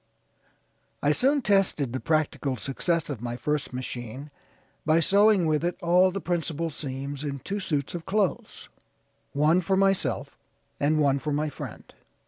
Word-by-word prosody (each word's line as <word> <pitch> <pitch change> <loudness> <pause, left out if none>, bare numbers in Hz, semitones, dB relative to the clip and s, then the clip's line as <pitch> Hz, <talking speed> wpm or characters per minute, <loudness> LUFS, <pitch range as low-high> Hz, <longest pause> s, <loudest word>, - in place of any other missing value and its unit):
I 145 - +4
soon 270 - +2
tested 190 - +2
the 130 - -2
practical 150 -4 0
success 160 - -1
of 125 -6 -6
my 120 0 -4
first 150 +2 -2
machine 130 +2 -6 0.5
by 160 +1 +3
sewing 200 +2 +4
with 155 0 +1
it 175 0 -1
all 180 +2 +4
the 195 +2 -4
principal 165 -2 -2
seams 140 0 -5
in 140 -2 -3
two 200 +9 -4
suits 145 -7 -2
of 170 -2 -6
clothes, 200 -2 -1 0.7
one 155 +5 +3
for 190 +2 +1
myself, 195 -1 0 0.4
and 150 +2 +2
one 140 -2 +3
for 150 +2 -3
my 150 +1 0
friend. - - -9
155 Hz, 150 wpm, -26 LUFS, 140-180 Hz, 0.7 s, I